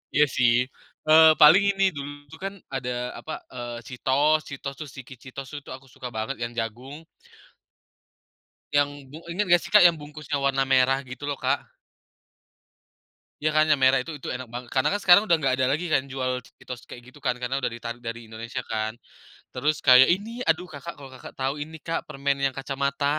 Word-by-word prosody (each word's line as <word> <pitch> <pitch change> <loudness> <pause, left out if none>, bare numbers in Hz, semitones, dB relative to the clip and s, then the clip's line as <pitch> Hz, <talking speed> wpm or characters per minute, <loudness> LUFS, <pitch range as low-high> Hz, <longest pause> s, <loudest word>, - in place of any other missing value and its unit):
Iya 150 +1 +6
sih, 120 -2 +5 0.6
eee, 160 0 +9
paling 160 +7 +8
ini. 195 -1 +1
Dulu 145 -1 -6 0.2
tuh 160 - -11
kan, 195 0 -3 0.2
ada 125 -2 -3
apa, 155 - -7 0.2
eee, 120 -1 -6
Cheetos 140 +5 +1
Cheetos 140 0 -6
terus 150 -3 -8
Chiki 130 0 -10
Cheetos 135 +2 -8
tuh, 145 - -4
itu - - -15
aku 130 +1 -9
suka 125 - -6
banget, 110 +4 -4
yang 115 0 -3
jagung 125 +7 -5 1.7
yang, 145 -1 0
bu 155 +4 -11
inget 205 +4 0
nggak 175 0 +6
sih - - -10
Kak, 210 - +9
yang 175 -2 +6
bungkusnya 150 -1 -5
warna 135 -1 +1
merah 135 0 +3
gitu 130 +1 -9
loh, 145 - -1
Kak. - - -1 1.7
Ya 155 0 0
kan, 155 0 +4
yang 145 - +3
merah 130 0 +4
itu 165 - -8
itu - - -8
enak 130 0 -7
banget. 120 +1 -7
Karena 130 +2 +3
kan, 205 - 0
sekarang 190 0 +7
udah 175 -6 +3
nggak 135 -3 +1
ada 130 0 +2
lagi 165 +5 -1
kan, 155 -5 +2
jual 130 -1 -1
Cheetos, 125 -1 -11
kayak, 120 - -11
gitu 130 +3 -15
kan, 125 -2 +1
karena 125 +2 -2
udah - - 0
ditarik 115 0 -7
dari 115 0 -6
Indonesia 115 +3 -6
kan. 110 0 -2 0.6
Terus, 145 +4 0
kayak, 130 -1 +8
ini, 215 +7 -1
aduh 165 +2 +2
Kakak, 155 +4 -7
kalau 140 -2 -11
Kakak 130 - -11
tahu, 135 +1 -1
ini 155 +2 -6
Kak, 165 +1 -3
permen 140 0 -1
yang 135 -1 0
kacamata, 140 +1 -2
135 Hz, 195 wpm, -25 LUFS, 125-155 Hz, 1.7 s, eee